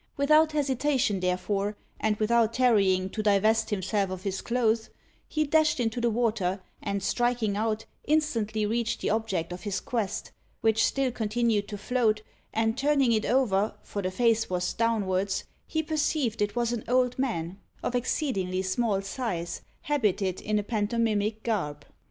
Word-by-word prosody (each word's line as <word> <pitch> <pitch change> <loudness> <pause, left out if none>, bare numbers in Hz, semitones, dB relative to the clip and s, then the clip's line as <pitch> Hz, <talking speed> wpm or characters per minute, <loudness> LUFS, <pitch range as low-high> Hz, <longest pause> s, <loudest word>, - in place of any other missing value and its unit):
Without 305 +2 +4
hesitation, 270 -7 +1
therefore, 195 +3 -1 0.2
and 220 -1 +1
without 230 +1 +2
tarrying 200 -7 +3
to 215 - -2
divest 215 +2 +3
himself 200 -1 0
of 185 0 -6
his 195 -1 -2
clothes, 230 -2 +1 0.4
he 310 - 0
dashed 305 -1 +3
into 235 0 0
the 235 - +3
water, 215 -5 0 0.2
and 200 -2 -2
striking 240 -2 +1
out, 220 +1 -1 0.2
instantly 230 -9 +1
reached 230 +2 -1
the - - 0
object 195 -6 -1
of 180 - -8
his 195 0 -2
quest, 225 -5 -3 0.3
which 225 0 +3
still 270 -2 +1
continued 220 -2 0
to 205 - -5
float, 220 -1 +1 0.3
and 225 +2 0
turning 280 -3 +3
it 220 -1 +1
over, 220 -5 +2
for 200 - -4
the 185 - -1
face 225 +3 +2
was 180 -1 -1
downwards, 200 -4 0 0.2
he 315 0 -1
perceived 295 -7 0
it 205 +1 0
was 240 0 +1
an 230 - -3
old 250 0 +2
man, 190 -8 -2 0.2
of - - -1
exceedingly 195 - -1
small 195 +1 0
size, 190 -6 -3 0.2
habited 210 - 0
in 215 0 0
a 210 - 0
pantomimic 215 0 0
garb. 185 -11 -2
220 Hz, 155 wpm, -28 LUFS, 200-245 Hz, 0.4 s, Without